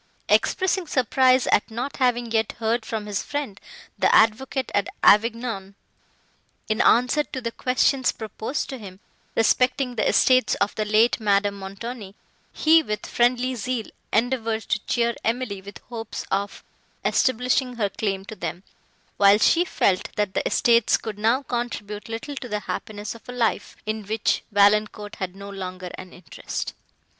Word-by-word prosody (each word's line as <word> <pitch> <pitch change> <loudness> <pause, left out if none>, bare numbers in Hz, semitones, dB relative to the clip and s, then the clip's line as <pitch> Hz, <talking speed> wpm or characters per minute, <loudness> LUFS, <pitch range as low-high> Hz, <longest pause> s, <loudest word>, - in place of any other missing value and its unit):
Expressing 375 -1 +2
surprise 255 -1 +3
at 210 - +3
not 245 +5 -4
having 245 -3 +1
yet 220 -1 +1
heard 225 0 -1
from 220 -2 -3
his 205 -1 -2
friend, 285 -9 -4 0.4
the - - +3
Advocate 250 +4 +2
at 205 0 +1 0.2
Avignon, 220 -2 +3 0.9
in 215 +1 +1
answer 250 +5 +4
to 260 - -6
the 230 -2 -4
questions 255 +2 +1
proposed 220 +4 -4
to 265 -2 -6
him, 190 -3 -10 0.4
respecting 250 +3 +2
the 225 - +1
estates 255 -1 +4
of 200 - 0
the 215 - -2
late 220 +4 +3
Madame 200 -1 +2
Montoni, 200 +1 -7 0.4
he, 320 +1 +5
with 210 -8 -4
friendly 245 +1 +1
zeal, 245 -1 -3 0.2
endeavoured 225 -1 0
to 215 - 0
cheer 235 -1 +1
Emily 225 -4 -2
with 200 +1 -10
hopes 225 -2 -6
of 200 +1 -2 0.4
establishing 250 0 +1
her 210 -4 0
claim 195 -1 -3
to 220 - -8
them; 175 0 -5 0.5
while 200 0 +6
she 330 +10 +4
felt, 190 - 0
that 205 -2 -1
the - - +1
estates 235 -2 +3
could 210 -2 -7
now 230 +6 +2
contribute 230 -5 -4
little 230 +6 -5
to 245 - -6
the 210 -1 -2
happiness 205 +1 -5
of 230 +1 -15
a - - -5
life, 235 -3 -1
in 215 0 -2
which 220 +1 0
Valancourt 205 0 +2
had 185 -1 -4
no 200 0 -9
longer 185 -2 -6
an 185 -1 -10
interest. 180 - -6
225 Hz, 155 wpm, -24 LUFS, 205-250 Hz, 0.9 s, while